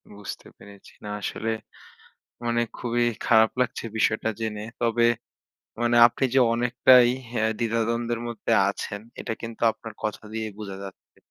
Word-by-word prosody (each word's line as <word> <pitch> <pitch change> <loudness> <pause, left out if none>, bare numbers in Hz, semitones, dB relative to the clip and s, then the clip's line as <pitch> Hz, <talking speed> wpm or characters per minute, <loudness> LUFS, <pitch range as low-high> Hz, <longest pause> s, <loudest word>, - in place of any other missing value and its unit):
বুঝতে 100 -1 -8
পেরেছি। 100 -1 -15
না - - -5
আসলে 110 +3 -2 0.9
মানে 120 0 +1 0.2
খুবই 120 0 0 0.2
খারাপ 110 -1 +5
লাগছে 125 - -1
বিষয়টা 110 0 +1
জেনে। 105 -2 -3 0.2
তবে 115 0 +3 0.8
মানে 120 0 +2
আপনি 125 +3 -1
যে 135 - +5
অনেকটাই 125 +1 +5 0.2
অ্যা 110 -3 0
দ্বিধাদ্বন্দ্বের 115 0 0
মধ্যে 115 0 -4 0.2
আছেন 100 0 -5 0.2
এটা - - -3
কিন্তু 115 -1 -8
আপনার 115 0 -10
কথা 110 0 -3
দিয়ে 110 0 -2
বোঝা 100 -2 -6
যাচ্ছে। 95 -1 -12
115 Hz, 140 wpm, -25 LUFS, 110-120 Hz, 0.9 s, খারাপ